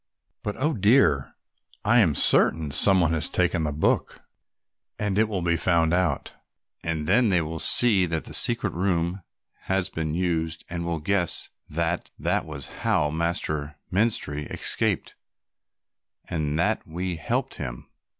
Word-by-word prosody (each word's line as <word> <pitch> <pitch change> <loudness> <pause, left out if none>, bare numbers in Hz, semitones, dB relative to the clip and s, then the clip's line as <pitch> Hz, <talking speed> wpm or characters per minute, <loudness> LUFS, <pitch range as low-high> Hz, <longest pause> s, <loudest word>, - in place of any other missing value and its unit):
But, 105 - -4
oh, 150 +4 0
dear, 105 - +2 0.5
I 120 +4 +4
am 85 -10 +3
certain 75 0 +3
some 95 +5 +6
one 80 -1 +1
has 80 -1 +1
taken 85 -3 0
the 75 - -2
book 75 +2 -1 0.7
and 105 -1 -1
it 110 - +4
will 95 -5 -3
be 85 -1 +1
found 85 -1 +2
out, 90 -6 -1 0.5
and 80 -2 -3
then 110 +7 +3
they 90 -2 +3
will 80 +1 -6
see 100 -4 +5
that 80 -1 -2
the - - -8
secret - - +3
room 90 0 -1 0.4
has 95 0 -1
been 80 -1 -3
used 85 -2 -2
and 85 -1 -4
will 85 -1 -2
guess 90 +1 0 0.2
that 85 +2 -2
that - - -1
was 70 -4 -6
how 75 0 +1
Master 75 -2 -2 0.2
Menstrie 95 -8 0
escaped - - 0 1.1
and 75 -2 -2
that 85 - -1
we 90 +1 -4
helped 75 - -3
him. - - -7
85 Hz, 150 wpm, -25 LUFS, 80-95 Hz, 1.1 s, some